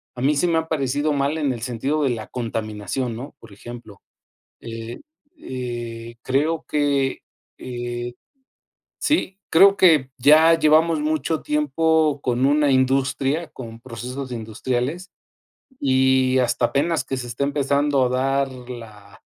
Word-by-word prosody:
a 125 - -6
mí 145 +3 +2
sí 175 - +2
me 165 -1 +2
ha 160 - -5
parecido 145 0 0
mal 140 +2 0
en 145 -4 0
el 120 -3 -5
sentido 135 +5 -1
de 135 - +2
la 110 -3 -5
contaminación, 115 +1 -4
¿no?, 135 +5 -9
por - - -15
ejemplo, 110 0 -11 0.7
eh 115 +1 -7 0.4
eh, 120 -2 -6
creo 155 +5 0
que, 140 -2 0 0.4
eh 120 -1 -5 0.9
sí, 200 - 0
creo 195 +4 +6
que 155 -7 +4
ya 155 +5 +6
llevamos 160 +1 +4
mucho 155 +1 -1
tiempo 150 0 +1
con 125 0 +1
una 145 +1 +3
industria, 135 +4 +1
con 115 -3 -10
procesos 125 +2 -7
industriales 125 - -3 0.7
y 130 -1 +3
hasta 120 -1 +1
apenas 150 +6 0
que 135 - -4
se 125 -1 -5
esté 120 +3 -3
empezando 140 0 +1
a - - 0
dar 135 +2 0 0.2
la 110 -5 -11
135 Hz, 135 wpm, -22 LUFS, 120-150 Hz, 0.9 s, creo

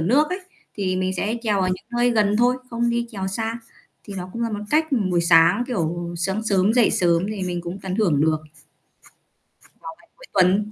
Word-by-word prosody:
nước 260 - +3
ấy, 365 +2 -3 0.3
thì 185 -3 -1
mình 185 0 -1
sẽ 215 +5 -1
chèo 210 -4 +1
ở 185 - +1
những 185 +3 -4
nơi 245 0 +3
gần 210 -3 +2
thôi, 245 +1 +3
không 235 0 0
đi 235 0 -1
chèo 195 -4 -4
xa. 225 +4 -3 0.5
Thì 200 - -8
nó 180 0 -6
cũng 235 - -4
là 230 - -1
một 205 -1 -4
cách 310 +1 +3 0.3
buổi 175 -1 +2
sáng, 170 +7 +5
kiểu, 175 -6 -3
sáng 190 +5 -1
sớm 200 -1 +2
dậy 245 -3 +4
sớm 170 0 +2
thì 210 -3 -4
mình 175 -1 -2
cũng 175 +2 -6
tận 190 -1 -3
hưởng 175 -10 +2
được. 155 +1 +3
Vào 155 0 -17 1.5
ngày - - -47
cuối - - -13
tuần, 195 +3 +3
195 Hz, 215 wpm, -22 LUFS, 175-230 Hz, 1.5 s, sáng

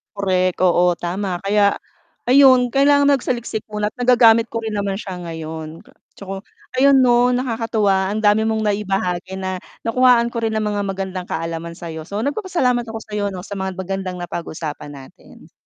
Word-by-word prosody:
Korek, 185 -2 +1
oo, 175 -1 +3
tama. 180 +2 -3
Kaya, 200 0 +3 0.5
ayun, 255 -2 +5
kailangan 285 +1 +4
magsaliksik 240 -5 -2
muna, 210 0 -2
at - - -67
nagagamit 230 -2 +5
ko 230 -1 -5
rin 220 - -3
naman 200 -2 -2
siya 190 -3 -6
ngayon. 160 -1 -7
K - - -21 0.2
tsaka, 195 -1 -7 0.4
ayun, 275 -1 +6
'no, 245 0 +4
nakakatuwa, 225 -6 0
ang 215 +2 -3
dami 215 +2 +3
mong 220 -1 0
naibahagi 195 -3 -1
na, 185 -1 -4 0.2
nakuhaan 235 0 +3
ko 235 - -3
rin 225 -1 -1
ng 215 - 0
mga 205 -1 -1
magandang 190 -1 -4
kaalaman 165 0 -4
sa'yo. 160 -2 -8
So, 205 +3 -3
nagpapasalamat 280 - 0
ako 225 0 -6
sa'yo, 210 -1 -3
'no, 185 -2 -6
sa 200 -2 -7
mga 190 -1 -3
magandang 190 0 -4
napag-usapan 155 -3 -6
natin. 135 -1 -15
205 Hz, 165 wpm, -20 LUFS, 185-235 Hz, 0.5 s, ayun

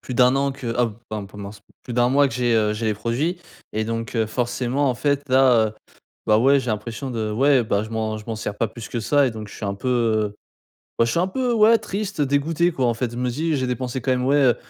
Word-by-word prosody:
plus 125 - -6
d'1 125 +1 +5
an 140 0 +1
que 130 -3 -5
ah 120 - +4
b 110 - -7 0.2
ben 105 -2 -4
pendant 100 0 -9
s 100 -1 -14 0.2
plus 120 - -7
d'1 120 0 +3
mois 140 +2 +4
que - - -5
j'ai, 120 -2 +1
heu, 105 -1 +2
j'ai 110 +1 -3
les 110 - +1
produits» 120 - -2 0.4
et 110 0 0
donc, 115 +1 -4
heu, 110 - +2
forcément 125 +4 -1
en 125 - +1
fait 140 +2 -1
là, 130 -4 +5
heu, - - -9 0.6
bah 105 0 +5
ouais, 135 +4 +4
j'ai 125 - -4
l'impression 115 +5 -4
de 110 -2 -2
ouais 135 +2 +3
bah 100 -2 0
je 110 - -8
m'en 110 -1 -2
je 105 - -11
m'en 115 - -4
sers 105 -1 -5
pas 115 - +1
plus 115 +1 -10
que 120 - -3
ça 140 +5 +3
et 125 - 0
donc 110 -1 -7
je - - -12
suis - - -9
un 100 - -1
peu, 100 +6 -6
heu, 110 -4 +1 0.7
je 115 - -1
suis 170 - 0
un, - - +3
heu, - - -10
peu, 255 -2 0
ouais, 225 +1 +6
triste, 200 -4 -5
dégoûté 150 +5 +1
quoi 130 -5 +1
en 120 - +2
fait 120 0 -3
je - - -7
me 125 0 -1
suis 160 +7 -2
dit: 145 - +1
«J'ai 130 - -1
dépensé 125 0 -3
quand 130 - 0
même, 125 0 0
ouais, 140 - +3
heu, 130 -5 +4
125 Hz, 285 wpm, -22 LUFS, 110-140 Hz, 0.7 s, ouais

